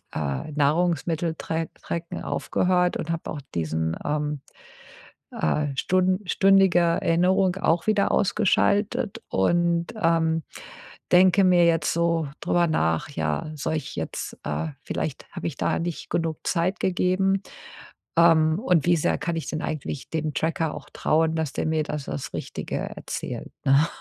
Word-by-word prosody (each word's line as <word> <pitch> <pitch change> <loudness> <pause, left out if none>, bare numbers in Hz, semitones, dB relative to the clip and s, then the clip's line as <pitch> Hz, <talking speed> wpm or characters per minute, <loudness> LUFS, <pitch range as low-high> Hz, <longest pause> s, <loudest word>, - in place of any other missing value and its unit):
äh, 70 - -3
Nahrungsmitteltra 165 +1 0 0.2
Tracken 170 0 -5
aufgehört 180 -1 +1
und 165 - -4
habe 165 0 -4
auch 145 - -5
diesen, 80 0 -1
ähm, 150 -1 -1 0.9
äh, 145 - 0
stun 185 +3 +2
stündige 195 -1 +4
Erinnerung 180 +2 +2
auch 170 -3 +1
wieder 210 -2 +2
ausgeschaltet 200 +1 +1
und, 170 - +2
ähm, 165 -1 +2 0.7
denke 185 +2 +6
mir 175 -2 +5
jetzt 165 -2 +2
so 170 -1 +1
drüber 175 0 +2
nach: 80 - 0
„Ja, 155 +2 -2
soll 155 +2 -2
ich 155 - -5
jetzt, - - -4
äh 80 +2 -2 0.2
vielleicht - - -4
habe - - -5
ich - - -7
da - - 0
nicht 170 -1 -4
genug 165 -2 -1
Zeit 180 +2 0
gegeben. 190 +1 +1 0.8
Ähm, 160 -1 +5
und 180 - +2
wie 175 - +5
sehr 155 - +1
kann 170 -1 -2
ich 160 - -4
denn 155 - -3
eigentlich 150 -2 -4
dem 155 -2 -2
Tracker 160 -1 -1
auch - - -10
trauen, 160 +1 +1
dass 160 -4 -2
der - - -2
mir 155 -1 +1
da 150 - -4
das 75 - -6
Richtige - - -4
erzählt?“, - - -5
ne? 140 +4 +5
165 Hz, 140 wpm, -25 LUFS, 155-180 Hz, 0.9 s, denke